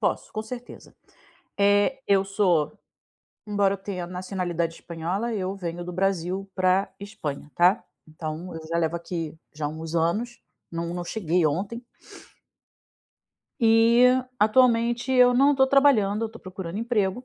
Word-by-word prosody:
Posso, - - -1
com 215 - -3
certeza. 245 +2 -10 0.6
Eh, 205 +6 +3
eu 195 -1 +3
sou 180 -7 +1 0.7
embora 205 -1 +2
eu - - -4
tenha 190 -3 -5
nacionalidade 180 -2 -3
espanhola, 175 +9 -3
eu 195 -2 -2
venho 175 -2 -5
do 180 - -6
Brasil 190 +1 -1
pra 185 +1 +1
Espanha, 180 -9 -6
tá, 180 +6 +4 0.2
então 155 +3 -6
eu 160 - -7
já 165 +1 -1
levo 165 0 0
aqui 165 -2 -5 0.2
já 150 -1 -3
uns 160 +2 -6
anos, 215 +9 0 0.3
não 170 0 -4
não 175 0 -4
cheguei 175 -4 0
ontem. 200 +10 -3 1.8
E 230 +1 +5 0.3
atualmente 240 +2 +3
eu 250 -1 +6
não 280 +3 +4
tô 265 - +4
trabalhando, 230 -7 +3
eu - - -2
tô 225 +1 -13
procurando 185 0 -6
emprego. 225 -1 -1
195 Hz, 140 wpm, -25 LUFS, 170-225 Hz, 1.8 s, eu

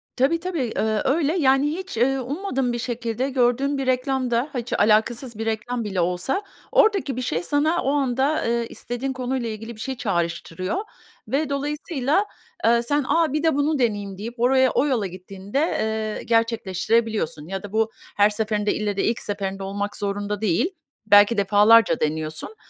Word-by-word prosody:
Tabii 280 +6 +2
tabii, 355 -1 -3 0.2
eee, 215 -1 0
öyle. 295 +2 +2
Yani 270 -2 +3
hiç, 370 -2 -6
eee, 270 +4 +2
ummadığım 270 -2 -2
bir 240 - -3
şekilde 240 +1 -2
gördüğüm 265 +2 +1
bir 270 - -2
reklam 255 0 0
da, 240 +5 +1
ha, 255 - -1
hiç 240 +1 -5
alakasız 225 +3 +2
bir 225 - -3
reklam 225 +2 -2
bile 195 -4 -1
olsa 180 - -1 0.3
oradaki 395 - +3
bir - - -1
şey 175 -9 -2
sana 300 - +1
o 270 - +1
anda, 275 +1 +1
eee, 235 0 0
istediğin 250 +3 -4
konuyla 255 -2 -2
ilgili 225 +2 -7
bir - - -16
şey 265 +1 -4
çağrıştırıyor 175 - -2 0.5
ve 290 +2 0
dolayısıyla, 290 +4 -1 0.4
eee, 235 0 +4
sen 290 +3 0
a 325 -4 +2
bir 305 +1 0
de 320 -3 +3
bunu 290 +1 +1
deneyeyim 205 -5 -1
deyip 230 +4 -7
oraya 260 +1 +4
o 275 - +2
yola 245 -8 0
gittiğinde, 190 +5 -5
eee, 220 -8 -1
gerçekleştirebiliyorsun. 225 -6 0
Ya 195 +1 -5
da 205 - -8
bu 220 0 +1 0.3
her 205 0 +6
seferinde 210 -1 -1
ille 205 -2 -2
de - - +1
ilk 230 - 0
seferinde 195 -1 -4
olmak 205 +1 -3
zorunda 205 0 -3
değil. 220 - +1 0.3
Belki 205 +2 +6
defalarca 205 -1 +5
deniyorsun 155 - -3
235 Hz, 170 wpm, -23 LUFS, 205-270 Hz, 0.5 s, her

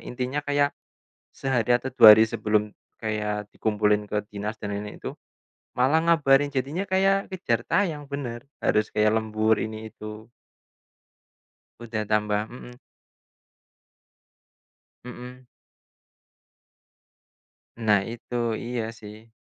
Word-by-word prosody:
intinya 125 +3 -3
kayak 145 0 +1 0.6
sehari 125 -3 +1
atau 125 +2 0
2 115 -4 +10
hari 110 +1 +4
sebelum, 105 -1 0 0.3
kayak 105 -1 -2
dikumpulin 105 -1 +1
ke 105 0 -2
dinas 105 +1 -4
dan 105 - -4
ini-itu, 105 0 -7 0.6
malah 135 +6 +3
ngabarin 145 -4 +4
jadinya 145 +8 -3
kayak 195 +1 +2
kejar 120 -12 -1
tayang 155 -8 0
benar, 130 -4 -5 0.2
harus 105 0 +2
kayak 105 0 +2
lembur 110 0 +1
ini-itu. 110 0 -7 1.5
Udah 110 -2 -3
tambah 105 -1 +1
mhm. 125 0 -10 2.3
Mhm. 125 +1 -10 2.3
Nah 105 -4 +3
itu, 120 +1 -9 0.3
iya 120 -1 -2 0.2
sih. 110 +2 -13
115 Hz, 100 wpm, -25 LUFS, 105-135 Hz, 2.3 s, 2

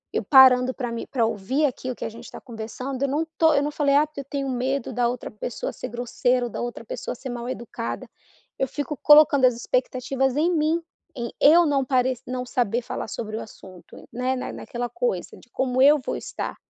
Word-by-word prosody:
eu - - 0
parando 260 -2 +6
pra 245 -3 -4
me 235 - -5
pra 240 -5 +1
ouvir 230 +7 0
aquilo 255 -2 -3
que - - -6
a - - -3
gente 230 +2 -12
está - - -10
conversando 250 +3 -6
eu - - +2
não 300 +4 0
tô 320 -1 +5
eu 280 -1 +2
não 295 - -2
falei: 285 -2 +1
"Ah, 300 +2 +4
eu 280 - -5
tenho 275 0 -4
medo 260 +1 -2
da 245 -1 +1
outra 245 0 -4
pessoa 225 +2 -5
ser - - -6
grosseira 245 +1 0
ou 240 - -6
da - - -5
outra 240 -1 -5
pessoa 225 - -5
ser 260 +2 -8
mal 240 0 -5
educada." 235 -2 -5 0.5
Eu 265 - +1
fico 290 +2 -4
colocando 295 -2 +6
as 250 -2 +4
expectativas 255 +2 -1
em 330 +4 +2
mim 315 +2 +2 0.4
em 235 -2 -4
eu 335 +4 +7
não 280 -3 +1
parec 255 -1 +1
não 250 0 -3
saber 240 -1 0
falar - - -5
sobre 215 0 -5
o - - -4
assunto, 185 -4 -13
né, 250 +2 -1
naquela 245 -1 -5
coisa 485 - -2 0.2
como 260 -1 0
eu 295 +2 +7
vou - - -2
estar, - - -5
255 Hz, 210 wpm, -24 LUFS, 240-280 Hz, 0.5 s, eu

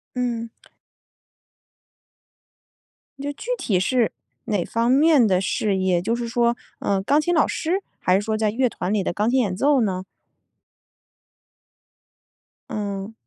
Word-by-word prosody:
嗯。 235 -2 -2 2.7
就 285 +1 -3
具 465 - -8
体 190 -5 +1
是 240 +3 +1 0.3
哪 205 -6 -1
方 230 +1 0
面 285 -2 +5
的 185 -3 +2
事 195 +1 0
业？ 185 -2 +1
就 225 +5 0
是 235 -1 -4
说， 235 0 +1 0.2
呃， 195 -1 0
钢 285 +9 +3
琴 350 +3 0
老 315 - +4
师， 360 +5 -1 0.2
还 180 - +2
是 195 - +3
说 215 +1 -2
在 215 -1 +1
乐 250 +4 +1
团 195 -4 -4
里 210 -2 +1
的 - - -2
钢 210 +5 0
琴 260 - +2
演 200 -6 0
奏 275 +4 +3
呢？ 185 -4 -1 2.7
嗯。 200 0 -4
225 Hz, 150 characters per minute, -23 LUFS, 195-255 Hz, 2.7 s, 面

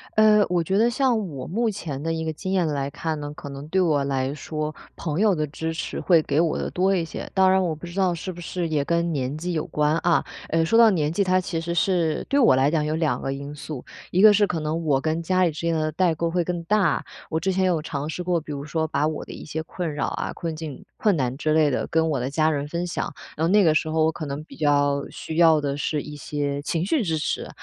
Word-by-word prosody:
呃， 215 -1 +6
我 175 -2 +1
觉 190 +4 0
得 235 +2 +4
像 240 -6 +1
我 135 -4 -7
目 230 +6 0
前 160 -9 -4
的 165 0 -1
一 160 - -2
个 160 - -1
经 185 +5 -4
验 180 -4 +2
来 140 -2 -1
看 155 +1 -3
呢， 145 0 -6
可 145 - -8
能 140 +2 -8
对 190 +3 +2
我 150 -5 +2
来 135 -1 -1
说， 155 +1 -4 0.2
朋 160 0 -3
友 210 -1 +4
的 155 -3 -1
支 160 +3 -4
持 160 - -4
会 170 -4 +4
给 145 0 0
我 165 -1 +2
的 - - -2
多 190 +2 +2
一 170 - 0
些。 165 - -6
当 190 -1 +5
然 190 0 +3
我 170 - 0
不 165 +3 -9
知 175 +3 -5
道 185 -2 +3
是 185 +3 -5
不 175 - -10
是 175 0 -3
也 145 -3 0
跟 170 0 +1
年 135 -2 -2
纪 175 +3 -3
有 155 - -1
关， 150 +1 +1
啊， 175 -1 +3 0.3
呃， 165 0 +2
说 225 +8 +2
到 230 -2 +7
年 150 -5 0
纪， 200 +5 +1
它 185 0 +2
其 170 -2 -3
实 170 +1 -3
是 170 -2 +1
对 280 - +3
我 230 - +6
来 135 +2 +3
讲 150 -1 +1
有 155 +1 -1
2 155 -7 0
个 135 - -3
因 140 +1 -7
素。 150 -2 -7 0.3
一 185 - +3
个 215 0 +9
是 205 0 +4
可 175 -4 -2
能 160 +2 -2
我 135 -3 +2
跟 160 +2 -1
家 185 +2 +2
里 175 - +4
之 150 - -7
间 170 0 0
的 155 -1 0
代 175 0 +2
沟 170 +1 -1
会 175 +1 +1
更 175 0 -3
大， 195 -6 +2 0.3
我 160 - +1
之 190 +4 0
前 190 0 +1
有 175 -4 +1
尝 145 -1 -4
试 160 +3 -4
过， 175 -1 +1
比 155 -1 -9
如 140 -1 -4
说 160 +1 -1
把 150 0 0
我 155 -1 -4
的 - - -9
一 - - -9
些 160 +1 -4
困 165 -3 -4
扰 145 - -1
啊， - - -3
困 165 -2 -4
境、 155 -4 -7
困 205 -5 +2
难 130 -2 -1
之 155 +1 0
类 155 -2 +4
的 - - -1
跟 160 0 +1
我 140 - 0
的 125 +2 -2
家 155 +2 +2
人 145 -1 -2
分 170 +3 -3
享， 175 - -3 0.2
然 160 - -2
后 165 - +2
那 205 0 +6
个 160 - +4
时 155 0 +1
候 155 0 +2
我 160 - +2
可 155 -2 -6
能 140 +2 -5
比 - - -14
较 145 -2 +2
需 160 - -6
要 160 -2 +6
的 140 -1 -2
是 150 0 -2
一 150 - -8
些 145 -1 -3
情 165 +3 -1
绪 255 +5 +1
支 165 -5 0
持， 150 - -2
160 Hz, 300 characters per minute, -24 LUFS, 150-180 Hz, 0.3 s, 个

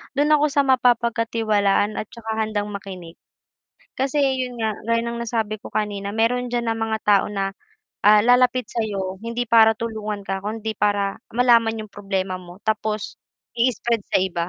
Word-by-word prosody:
dun 290 +2 +2
ako 300 0 +5
sa 285 -1 +2
mapapagkatiwalaan 230 -5 +2
at 215 - -5
tsaka 225 -1 -7
handang 210 -1 -2
makinig, 185 -4 -9 0.8
kasi 270 +2 0
yun 260 -3 0
nga 220 -2 -1 0.2
gaya 230 0 +2
ng 235 0 -4
nasabi 220 -2 -2
ko - - -9
kanina 205 -2 -2
meron 230 +4 0
dyan 240 0 -1
na - - -4
mga 225 0 -1
tao 205 -1 +4
na, 195 -1 -2 0.5
ah, 210 +1 +7
lalapit 250 +1 +3
sa 230 - -2
'yo, 195 -3 -3
hindi 235 +1 -3
para 225 -1 +6
tulungan 215 -2 -4
ka, 195 0 -4
kundi 220 0 -4
para 205 -1 +1 0.2
malaman 230 -2 +3
yung 215 - -8
problema 195 -2 -3
mo, 180 +1 -12
tapos 215 -1 -2 0.4
i-spread 235 -1 0
sa - - +2
iba 175 -2 -1
220 Hz, 165 wpm, -22 LUFS, 205-235 Hz, 0.8 s, ah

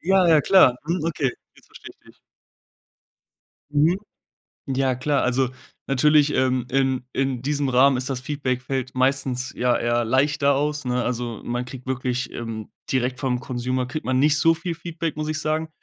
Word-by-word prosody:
Ja, 190 +1 +3
ja, 155 -2 +6
klar. 165 -8 +5
Mhm, 170 -1 -1
okay, 145 -5 0 0.2
jetzt - - -22
versteh - - -12
ich - - -39
dich. - - -18 1.5
Mhm. 155 +5 +3 0.7
Ja, 135 -1 0
klar. 140 +3 0
Also 125 +1 +1 0.4
natürlich, 150 +2 +4
ähm, 130 -1 +1
in 130 -1 +1
in 135 -2 -1
diesem 145 0 -1
Rahmen 130 +2 +4
ist 125 +2 -3
das 130 - -2
Feedback 130 -2 -2
fällt 130 0 -3
meistens 130 -1 0
ja 125 0 +1
ja 120 0 +1
leichter 140 +4 +2
aus, 150 +1 -1
ne? 125 0 0
Also, 120 -2 -3
man 120 +1 -2
kriegt 125 0 -10
wirklich, 125 -1 -2
ähm, 115 -2 -6 0.2
direkt 130 0 0
vom 125 -3 -1
Consumer 125 0 -2
kriegt 150 +5 -5
man 130 0 +1
nicht 150 +2 +4
so 165 0 +4
viel 170 +1 -4
Feedback, 165 -2 -4
muss 155 0 -3
ich 155 0 -2
sagen. 155 +1 -1
130 Hz, 175 wpm, -23 LUFS, 125-150 Hz, 1.5 s, ja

